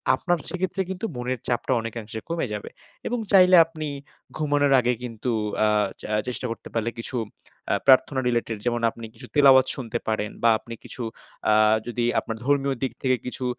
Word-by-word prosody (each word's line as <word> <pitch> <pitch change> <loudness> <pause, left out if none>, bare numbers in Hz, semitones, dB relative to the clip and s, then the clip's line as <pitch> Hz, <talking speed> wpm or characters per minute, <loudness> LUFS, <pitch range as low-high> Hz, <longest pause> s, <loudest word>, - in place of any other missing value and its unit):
আপনার 175 -1 0
সেক্ষেত্রে 185 +1 -2
কিন্তু 190 +3 -4
মনের 125 +1 -3
চাপটা 125 +1 0
অনেকাংশে 110 -1 -6
কমে 165 -4 -1
যাবে। 105 - -5 0.4
এবং 245 0 -1
চাইলে 185 -1 +7
আপনি 155 -2 -6 0.5
ঘুমানোর 145 -2 +2
আগে 125 0 +1
কিন্তু 120 0 -3 0.3
আ - - +4 0.3
চ - - -15
আ - - +3
চেষ্টা 125 0 -4
করতে 115 - -7
পারলে 115 0 0
কিছু 120 - -5 0.6
আ - - +3
প্রার্থনা 130 0 +5
রিলেটেড 120 -2 -1
যেমন 120 -1 0
আপনি 115 0 -9
কিছু 125 +3 -11
তিলাওয়াত 135 -2 +7
শুনতে 120 -3 -4
পারেন 105 -1 -1
বা 115 - +6
আপনি 115 - -10
কিছু 125 - -7 0.5
আ - - +5 0.3
যদি 120 0 -1
আপনার 115 0 -5
ধর্মীয় 140 -1 +1
দিক 130 - 0
থেকে 130 -1 +3
কিছু 125 0 -4
125 Hz, 175 wpm, -24 LUFS, 115-145 Hz, 0.6 s, চাইলে